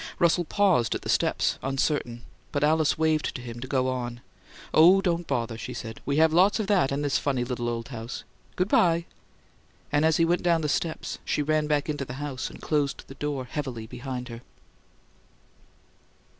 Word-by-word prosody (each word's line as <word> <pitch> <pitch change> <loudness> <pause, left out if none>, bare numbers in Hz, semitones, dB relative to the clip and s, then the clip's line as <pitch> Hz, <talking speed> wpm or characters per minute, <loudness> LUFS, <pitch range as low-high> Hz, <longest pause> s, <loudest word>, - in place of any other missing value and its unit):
Russell 170 +1 +3
paused 185 - +2
at - - -5
the - - -6
steps, - - +1
uncertain, 135 -3 -1 0.3
but 145 -1 -1
Alice 155 0 +3
waved 155 -1 +1
to - - -4
him 120 -1 -7
to 130 - -6
go 130 -1 +1
on. 120 -2 -3 0.5
"Oh, 175 +5 +7
don't 175 -3 -1
bother," 115 -4 -2
she - - -6
said. 110 -1 -7
"We 140 0 +1
have 160 0 +5
lots 190 +6 +4
of 215 - 0
that 195 -9 +2
in 140 +1 -1
this 145 -2 +1
funny 135 -4 0
little 120 -1 -2
old 115 +2 -4
house! 120 -1 -6 0.3
Good 180 - +1
bye!" 170 -4 +3 0.9
And 145 +1 +2
as 160 -1 +4
he 165 - +4
went 175 +1 +1
down 170 -2 +2
the 150 - -1
steps, 160 +2 -2
she 150 - 0
ran 155 0 +1
back 150 -2 +1
into 145 -2 -2
the 125 - -7
house 135 -2 -4
and - - -12
closed 145 -3 -1
the - - -8
door 140 -2 -3
heavily 125 -5 -5
behind 125 +2 -6
her. 115 0 -8
145 Hz, 190 wpm, -26 LUFS, 125-160 Hz, 0.9 s, Oh